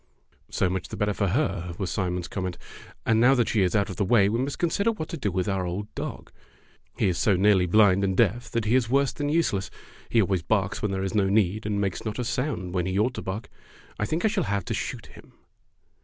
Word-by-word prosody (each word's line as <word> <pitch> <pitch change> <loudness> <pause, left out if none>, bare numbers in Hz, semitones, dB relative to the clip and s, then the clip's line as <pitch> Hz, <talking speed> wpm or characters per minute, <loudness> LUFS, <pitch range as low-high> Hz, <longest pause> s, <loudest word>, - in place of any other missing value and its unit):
"So - - +1
much 90 0 -3
the - - -7
better 105 0 0
for 100 - 0
her," 95 - -1
was 95 - -3
Simon's 90 -2 -2
comment; 95 -3 -4 0.5
"and 110 -1 +3
now 130 +3 +6
that 120 -3 +1
she 110 - +2
is 90 +1 +1
out 100 -1 +2
of 90 - -8
the 100 - +1
way 100 -1 +4
we 115 +3 0
must 135 +2 -2
consider 200 +6 +1
what 180 -8 -6
to 170 - -4
do 105 - -1
with 90 0 -1
our 95 -2 0
old 95 +4 -4
dog. - - -6 0.7
He - - +2
is 90 -2 0
so 100 - +3
nearly 95 -1 +4
blind 100 0 +4
and 95 -1 0
deaf 115 +2 +2
that 115 -2 -1
he 110 - +1
is 125 -3 +2
worse 140 0 +2
than 145 -1 -2
useless. 150 - 0 0.4
He 115 - +3
always 95 -4 +2
barks 100 +2 0
when 105 - 0
there 95 0 -2
is 95 - -2
no 100 -3 +2
need, 105 +1 +1
and 105 -1 -1
makes 100 -2 -2
not 110 -2 -4
a 125 - -1
sound 120 -7 -2
when 90 -1 0
he 95 +1 -1
ought 115 +5 +2
to - - -5
bark. 95 +4 -5 0.5
I 105 - 0
think 165 +6 -1
I - - +6
shall 205 -4 0
have 100 -3 -1
to - - -3
shoot - - -4
him." - - -16
100 Hz, 250 wpm, -26 LUFS, 95-120 Hz, 0.7 s, now